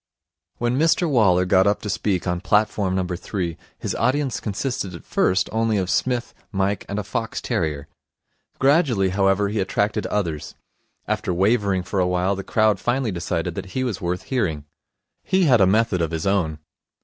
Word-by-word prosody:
When 120 +2 0
Mr 165 +2 +3
Waller 100 - +3
got 95 +1 +4
up 100 - +1
to 105 - -3
speak 95 -1 -1
on 90 -1 -1
platform 100 -1 +1
number 90 -1 -1
three, 90 -2 -3 0.2
his - - -3
audience 135 -1 0
consisted 105 -3 -3
at 85 - -10
first 95 +1 +1
only 110 -1 +1
of 95 -1 -1
Psmith, 125 +3 0 0.2
Mike, 100 0 -1
and 100 - -3
a 105 - -1
fox 110 +3 -3
terrier. 75 -3 -2 0.7
Gradually 135 - +3
however, 95 +1 +2
he 105 +1 -2
attracted 100 +2 0
others. 85 -8 -3 0.5
After - - -1
wavering 100 0 +2
for 95 +2 -2
a 90 - +2
while, 90 +2 +1
the 95 - -5
crowd 110 0 +2
finally 120 -2 0
decided 85 -2 -2
that - - -5
he 130 - +1
was 120 -7 -3
worth 90 +1 -2
hearing. 85 - -2 0.6
He 190 0 +2
had 125 - +5
a 95 - +6
method 105 -2 +2
of 80 - 0
his 80 0 -3
own. 90 -6 +1
100 Hz, 175 wpm, -22 LUFS, 90-115 Hz, 0.7 s, a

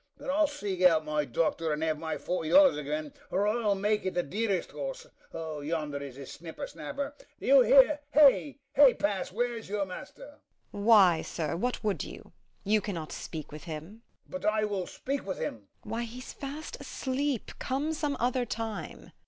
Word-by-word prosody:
But - - -4
I'll 305 +2 +3
seek 205 -11 -4
out 165 -4 +5
my 150 -1 0
doctor, 160 +5 0
and 150 +1 -1
have 155 -1 0
my 160 -1 -3
forty 160 +1 -2
dollars 285 - +7
again, 150 0 -3 0.2
or 200 +3 +1
I'll 210 -2 +2
make 210 +2 +1
it 185 - -2
the 175 - +2
dearest 200 +3 -1
horse! - - -5 0.3
O, 160 -2 -5
yonder 150 -1 -2
is 140 -3 -7
his 135 -1 -9
snipper 165 0 -7
snapper. 280 - -5 0.3
Do - - -8
you - - +7
hear? - - +6 0.2
you, 290 -1 +6 0.2
hey 280 -2 +8
pass, 200 -3 -1
where's 235 +1 -2
your 205 -1 0
master? 190 - -10 0.3
MEPHIST. 205 +1 -4
Why, 190 -8 +7
sir, 160 -2 -3
what 245 +8 -2
would 210 -2 0
you? - - -10 0.3
you 210 +1 +3
cannot 170 -7 -5
speak 155 -3 -6
with 150 +2 -9
him. 165 +7 -7 0.3
HORSE - - -23
COURSER. 275 - -4
But 215 - +2
I 215 0 +1
will 200 -4 -2
speak 275 +1 -3
with 190 -2 -4
him. - - -2
MEPHIST. 100 -2 -26 0.2
Why, 225 +3 -2
he's 250 +3 -8
fast 285 +3 -6
asleep: 265 -1 -2
come 285 +5 -1
some 295 -2 -1
other 250 +1 +1
time. 225 -2 -5
205 Hz, 195 wpm, -29 LUFS, 160-260 Hz, 0.3 s, hey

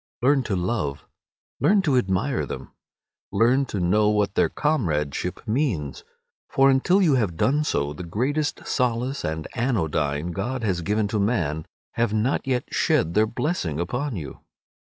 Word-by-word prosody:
Learn 140 +1 +4
to 105 - -1
love, 90 -7 -2 0.5
learn 200 -1 +4
to 145 -7 +2
admire 125 +3 0
them; - - -7 0.6
learn 130 +4 +3
to 105 - -3
know 105 +4 +3
what 105 -2 +1
their - - +2
comradeship 90 - -1
means; 105 - -1 0.5
for 135 0 +4
until 180 +9 +3
you 160 -5 +4
have 105 -10 0
done 145 - +2
so 70 - -1
the 75 - -8
greatest 130 - -2
solace 125 +2 -1
and 80 0 -3
anodyne 80 - 0
God 115 +7 -3
has 95 -5 0
given 105 +4 0
to 105 - -1
man 85 -8 0 0.2
have 115 -2 0
not 115 +6 0
yet 125 -2 +1
shed 80 - +2
their 110 +2 +3
blessing 105 - -2
upon 125 +11 -2
you. - - -7
110 Hz, 150 wpm, -24 LUFS, 85-135 Hz, 0.6 s, Learn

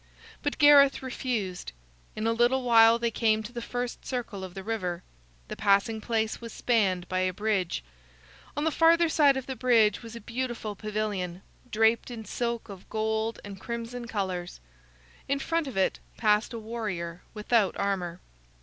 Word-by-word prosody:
But 290 - -2
Gareth 285 -2 +6
refused. 225 - -3 0.4
In 215 - -3
a 230 - +2
little 240 +3 +2
while 230 -1 +6
they 235 0 -1
came 220 -1 +2
to 215 - -8
the 240 - -4
first 245 +1 -4
circle 235 -6 -4
of 185 -1 -8
the 195 - -6
river. 185 -5 -3 0.4
The - - -6
passing 210 +2 +2
place 220 0 -1
was 230 -1 -7
spanned 195 -8 +1
by 185 - -1
a 185 0 +1
bridge. 195 - -1 0.7
On 295 - 0
the 320 - +2
farther 335 +2 +5
side 290 -4 +4
of 265 - -4
the 265 - -5
bridge 230 -5 +3
was 230 -1 -10
a - - -6
beautiful 235 -1 -4
pavilion, 205 -4 -3 0.3
draped 225 +2 +2
in 230 -3 -7
silk 235 0 -3
of 195 -3 -11
gold 220 +1 -1
and 195 -2 -9
crimson 235 +1 -5
colors. 185 -5 -3 0.7
In 280 - +2
front 330 +2 -1
of 250 -7 -6
it 190 - +1 0.2
passed 210 -1 +2
a 235 - -5
warrior 210 -7 -5
without 210 -2 +1
armor. 185 -3 -2
225 Hz, 170 wpm, -28 LUFS, 200-245 Hz, 0.7 s, Gareth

